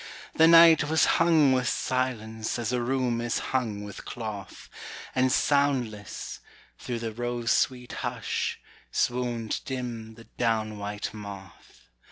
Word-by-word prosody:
The 160 Hz, -, +6 dB
night 165 Hz, -2 st, +8 dB
was 160 Hz, +2 st, +3 dB, 0.2 s
hung 160 Hz, -5 st, +5 dB
with 130 Hz, -2 st, +1 dB
silence 110 Hz, -4 st, -2 dB
As 120 Hz, -1 st, -2 dB
a 125 Hz, -, +1 dB
room 125 Hz, -1 st, 0 dB
is 120 Hz, 0 st, -1 dB, 0.2 s
hung 110 Hz, -6 st, -1 dB
with 100 Hz, -1 st, -8 dB
cloth, 105 Hz, -5 st, -7 dB, 0.5 s
And 130 Hz, 0 st, +2 dB
soundless, 130 Hz, -8 st, 0 dB, 0.4 s
through 120 Hz, -, -4 dB
the 115 Hz, -1 st, -4 dB
rose 120 Hz, 0 st, -2 dB
sweet 125 Hz, -2 st, +1 dB
hush, -, -, -3 dB, 0.3 s
Swooned 120 Hz, -2 st, -1 dB
dim 120 Hz, -4 st, -5 dB
the 115 Hz, -, -13 dB, 0.2 s
down 110 Hz, -3 st, 0 dB
white 105 Hz, +1 st, -4 dB
moth. 100 Hz, -, -11 dB
120 Hz, 130 wpm, -27 LUFS, 110-130 Hz, 0.5 s, night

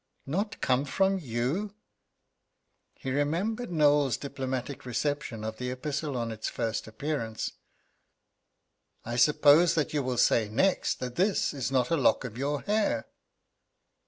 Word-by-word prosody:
"Not 200 Hz, +10 st, -2 dB
come 130 Hz, +1 st, +2 dB
from 195 Hz, +6 st, +1 dB
you?" 150 Hz, -, -2 dB, 1.2 s
He 130 Hz, -, -5 dB
remembered 175 Hz, -, -1 dB
Knowles's 145 Hz, -5 st, +3 dB
diplomatic 130 Hz, -1 st, -4 dB
reception 125 Hz, -2 st, -2 dB
of 110 Hz, 0 st, -4 dB
the 125 Hz, +1 st, -3 dB
epistle 140 Hz, +2 st, -3 dB
on 115 Hz, -1 st, -2 dB
its 110 Hz, -1 st, -4 dB
first 115 Hz, -1 st, -3 dB
appearance. 115 Hz, -1 st, -3 dB, 1.5 s
"I 120 Hz, -, -3 dB
suppose 150 Hz, +6 st, +5 dB
that 155 Hz, -2 st, 0 dB
you 150 Hz, -, +1 dB
will 130 Hz, -2 st, -2 dB
say 110 Hz, -2 st, +3 dB
next 185 Hz, -, +1 dB
that 125 Hz, -1 st, -5 dB
this 190 Hz, -2 st, +2 dB
is 135 Hz, -2 st, -3 dB
not 130 Hz, 0 st, +1 dB
a 165 Hz, -, +3 dB
lock 130 Hz, -4 st, +3 dB
of 120 Hz, -4 st, -6 dB
your 140 Hz, +3 st, -1 dB
hair?" 205 Hz, -, 0 dB
140 Hz, 135 wpm, -28 LUFS, 120-155 Hz, 1.5 s, suppose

